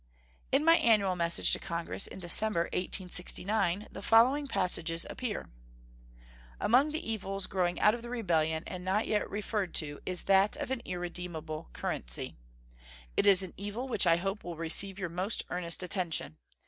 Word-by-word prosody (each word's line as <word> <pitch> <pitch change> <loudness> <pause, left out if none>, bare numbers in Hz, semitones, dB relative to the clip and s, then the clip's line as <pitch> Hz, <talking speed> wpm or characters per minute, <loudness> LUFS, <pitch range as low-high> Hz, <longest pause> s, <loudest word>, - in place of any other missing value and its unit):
In 275 +3 +2
my 330 0 +7
annual 200 -5 +3
message 170 -1 +3
to - - +1
Congress 170 +3 -3
in - - -10
December, 190 +1 +1
1869, 185 +2 -1
the 195 - -8
following 250 +7 +4
passages 170 -6 +1
appear: 245 -5 -5 1.1
Among 255 +7 +4
the 315 -3 -4
evils 195 -3 0
growing 180 -2 -1
out 210 - +5
of 235 - -5
the 235 - -8
rebellion, 160 -9 0
and 180 -1 -7
not 195 +4 0
yet 210 - -1
referred 205 -2 -3
to, 145 -2 -2
is 185 -1 -2
that 195 +1 +4
of 290 -2 -5
an 260 -3 -1
irredeemable 175 - -5
currency. - - -2 0.8
It - - +2
is 195 -1 +7
an 185 - -7
evil 205 +6 -5
which 255 - +2
I 165 - +6
hope 195 +3 -3
will 170 -2 -6
receive 185 +4 +2
your 190 -3 -3
most 185 +6 -2
earnest 175 0 0
attention. 175 - -1
190 Hz, 160 wpm, -30 LUFS, 175-215 Hz, 1.1 s, my